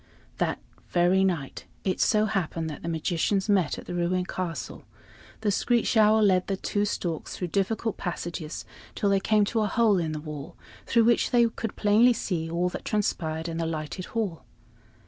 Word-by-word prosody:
That - - 0 0.3
very 180 +2 +3
night 170 -8 -2 0.2
it 185 - -1
so 215 -1 +3
happened 165 -6 -2
that 150 - -8
the 170 - -4
magicians 175 +4 0
met 195 -7 +2
at - - -9
the - - -6
ruined 180 +1 0
castle. 165 -10 -5 0.6
The 210 -2 +1
screech 240 +4 +1
owl 215 0 +5
led 185 -3 +3
the 195 - -1
two 205 +2 -1
storks 170 -5 -3
through 180 - -3
difficult 210 +4 -1
passages 170 -3 -5 0.3
till 200 - +1
they 195 - +4
came 210 +1 +3
to 220 +2 0
a 210 - +1
hole 220 -4 +3
in 160 -2 -2
the 155 - -3
wall, 150 +1 -8 0.3
through 230 -1 +4
which 235 0 +3
they 240 -2 +5
could 225 -1 -5
plainly 220 +4 +5
see 170 -7 -2
all 170 +2 0
that - - -7
transpired 160 -6 -1
in 165 -1 -4
the 165 -1 -1
lighted 160 +3 -4
hall. 195 - -3
185 Hz, 185 wpm, -27 LUFS, 165-210 Hz, 0.6 s, owl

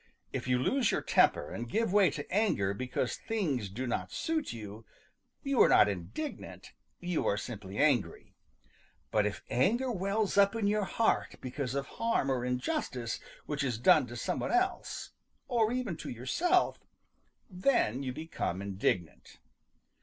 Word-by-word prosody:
If - - -3
you 125 0 +3
lose 235 - +2
your - - 0
temper 75 - +3
and 120 0 -5
give 225 - 0
way 205 -3 +6
to 145 +2 -6
anger 185 - +2
because 125 +3 -2
things 150 - -2
do 120 +7 -4
not 120 - -2
suit 320 -2 -1
you, 110 -1 -8 0.6
you 275 -3 +2
are - - +7
not - - +7
indignant; 100 - -6 0.3
you 175 -2 -1
are 100 - +2
simply 105 -4 -6
angry. 140 -8 +1 0.8
But 105 -1 +3
if 105 - -5
anger 235 - +2
wells 200 0 0
up 200 +2 +5
in 225 -2 0
your 205 0 +2
heart 225 +3 +1
because 130 0 -4
of 140 0 -1
harm 230 -12 0
or 125 -2 0
injustice 125 -1 -2 0.3
which 145 -1 -2
is 125 -5 -1
done 120 +1 +5
to 120 - -8
some - - -2
one - - -2
else, 370 +1 -1 0.4
or 230 -3 +2
even 245 -8 -2
to - - -7
yourself, 330 - +1 0.7
then 180 - +1
you 130 -2 -3
become 155 - -3
indignant. 95 -4 -2
140 Hz, 155 wpm, -31 LUFS, -, 0.8 s, are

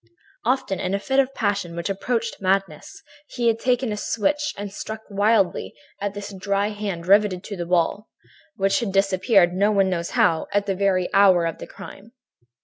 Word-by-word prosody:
"Often, 235 -6 0
in 185 +2 -1
a - - -1
fit 265 +6 0
of 270 0 +2
passion 200 -6 -1
which 170 0 -3
approached 225 +4 -2
madness, 195 +1 -2 0.2
he 245 -2 -4
had 225 0 0
taken 250 -1 0
a - - -2
switch 295 +9 -1
and 200 -1 -6
struck 220 +1 -6
wildly 205 -1 +1 0.3
at 205 0 -3
this 205 0 -7
dried 200 +2 -1
hand 200 -5 -4
riveted 195 -1 +3
to 205 - -6
the 175 -2 -5
wall, 180 +4 0 0.5
and - - -17
which 195 +8 +3
had 230 -5 -2
disappeared, 195 -1 +3
no 200 +3 +2
one 195 -2 +2
knows 170 -1 -2
how, 160 -1 +3
at 205 0 +1
the 195 - 0
very 190 -1 +1
hour 190 -4 +5
of 165 - -3
the - - -8
crime. 200 +4 -12
200 Hz, 190 wpm, -23 LUFS, 185-215 Hz, 0.5 s, hour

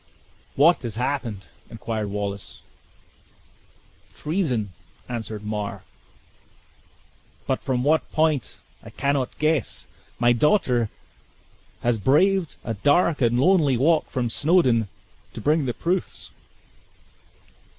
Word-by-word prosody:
"What 165 +5 +5
has 115 -4 -4
happened?" 120 -6 -3 0.2
inquired 110 -2 -4
Wallace. 100 -1 -5 1.5
"Treason," 140 - -1 0.4
answered 110 -3 -5
Mar; 105 -1 -4 1.6
"but - - -1
from 125 -2 -1
what 155 +3 +1
point 155 -5 0 0.2
I - - -11
cannot 140 -2 -1
guess. 155 -7 0 0.3
My 120 0 +4
daughter 125 - +2 0.9
has 120 -2 +1
braved 170 - +2
a 115 - -3
dark 145 - +2
and 120 0 +2
lonely 150 -4 +4
walk 155 +5 +2
from 125 -3 -1
Snawdoun, 135 - +3 0.5
to - - -5
bring 150 0 +1
the 120 - -1
proofs." 180 +2 -3
130 Hz, 100 wpm, -24 LUFS, 115-155 Hz, 1.6 s, What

